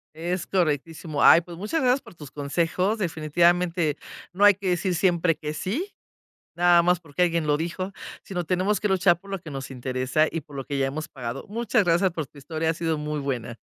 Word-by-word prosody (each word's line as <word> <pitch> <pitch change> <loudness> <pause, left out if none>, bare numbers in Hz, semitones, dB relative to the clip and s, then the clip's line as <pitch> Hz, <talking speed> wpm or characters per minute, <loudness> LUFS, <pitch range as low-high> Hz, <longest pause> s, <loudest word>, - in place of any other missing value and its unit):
Es 175 +2 -3
correctísimo, 155 -3 -1
ay, 170 - +8
pues 170 0 -11
muchas 215 - -2
gracias 255 +1 +3
por 185 - -16
tus 150 -4 -11
consejos, 170 +8 0
definitivamente 170 -1 +1 0.3
no 195 +3 +3
hay 205 - +8
que 195 0 -4
decir 180 +1 0
siempre 170 -2 +2
que 150 0 -5
sí, 250 - -3 0.6
nada 175 0 +5
más 180 0 +3
porque 160 0 -5
alguien 170 -3 +2
lo 145 - +3
dijo, 180 +5 -4 0.3
sino 180 -2 -4
tenemos 185 +5 0
que 210 - 0
luchar 185 -2 +4
por 195 +3 -16
lo 195 - -2
que 165 - -10
nos 135 -1 -6
interesa 130 +4 0
y 165 - -4
por 145 -1 -12
lo 135 - -5
que 140 - -3
ya 135 0 +1
hemos 155 +3 -4
pagado, 120 -4 -6
muchas 230 0 +1
gracias 175 +2 +3
por 160 -4 -4
tu 145 - -20
historia, 160 +3 -2
ha - - -3
sido 165 -1 -1
muy 150 0 -3
buena. 120 -4 -4
170 Hz, 210 wpm, -25 LUFS, 150-185 Hz, 0.6 s, ay